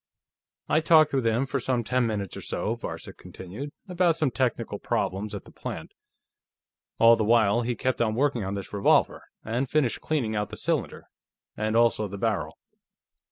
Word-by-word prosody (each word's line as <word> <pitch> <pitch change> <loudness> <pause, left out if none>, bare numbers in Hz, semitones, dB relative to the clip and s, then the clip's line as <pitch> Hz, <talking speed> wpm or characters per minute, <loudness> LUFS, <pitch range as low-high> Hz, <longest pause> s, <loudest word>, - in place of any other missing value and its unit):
"I 155 - +3
talked 155 -2 +5
with 130 -4 +1
him 115 +4 +1
for 135 0 -2
some 125 -1 0
ten 125 +1 +1
minutes 100 -4 -3
or - - -7
so," - - -2
Varcek - - -7
continued, 105 +11 -8 0.2
"about 175 -2 +2
some 150 -5 +1
technical 115 -3 -1
problems 100 -2 -2
at - - -8
the - - -14
plant. - - -7 1.0
All 115 0 +7
the 110 - -1
while, 115 0 +4
he 120 0 -2
kept 130 0 -1
on 110 -2 +1
working 130 -3 +1
on 95 +1 -3
this 100 0 -7
revolver, 100 -1 +2 0.2
and 120 +4 -1
finished 145 -6 +1
cleaning 125 -9 -1
out 105 -1 -1
the - - -8
cylinder, - - -2 0.5
and 110 +1 -1
also 115 -2 +3
the 100 +1 -7
barrel. - - -2
115 Hz, 175 wpm, -26 LUFS, 105-135 Hz, 1.0 s, All